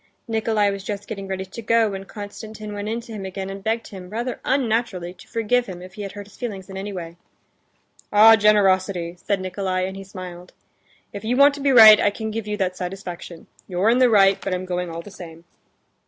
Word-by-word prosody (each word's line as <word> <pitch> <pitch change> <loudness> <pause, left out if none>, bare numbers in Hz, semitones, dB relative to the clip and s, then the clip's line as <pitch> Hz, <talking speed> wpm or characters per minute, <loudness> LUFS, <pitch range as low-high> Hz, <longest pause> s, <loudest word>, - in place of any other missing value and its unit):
Nikolay 220 -2 +1
was 195 -1 -6
just 205 -1 -5
getting 195 -3 -6
ready 190 0 -4
to 190 +5 -9
go, 230 -1 +2
when 195 0 -6
Konstantin 210 +1 -8
went 205 +1 -4
in 230 +2 -2
to 230 -1 -11
him 205 -2 -6
again 190 0 -5
and 195 0 -8
begged 225 +2 -2
him, 185 -3 -10
rather 240 +4 -4
unnaturally, 225 -9 -1
to 180 - -17
forgive 240 +2 0
him 180 -2 -7
if 185 - -12
he 210 - -8
had 200 -1 -6
hurt 205 0 -8
his 205 - -18
feelings 195 -5 -6
in - - -8
any 195 +2 -5
way. 170 -3 -7 0.9
"Ah, 220 +2 +8
generosity!" 190 -4 +2
said 200 -2 0
Nikolay, 185 0 -2
and 190 - -7
he 195 - -8
smiled. 180 -2 -10 0.6
"If 200 - -7
you 240 +3 0
want 280 +1 +7
to 285 - -7
be 280 - +2
right, 220 -4 +10
I - - +3
can 220 +2 -5
give 220 -1 -4
you 210 0 -2
that 185 -2 -1
satisfaction. 180 -2 -7 0.2
You're 190 +4 +2
in 245 - +3
the 255 -1 +5
right; 195 -3 +5
but 190 -2 -2
I'm 185 +1 -4
going 180 -1 -3
all 165 0 -6
the 205 - -12
same." 165 -3 -11
200 Hz, 225 wpm, -22 LUFS, 185-220 Hz, 0.9 s, right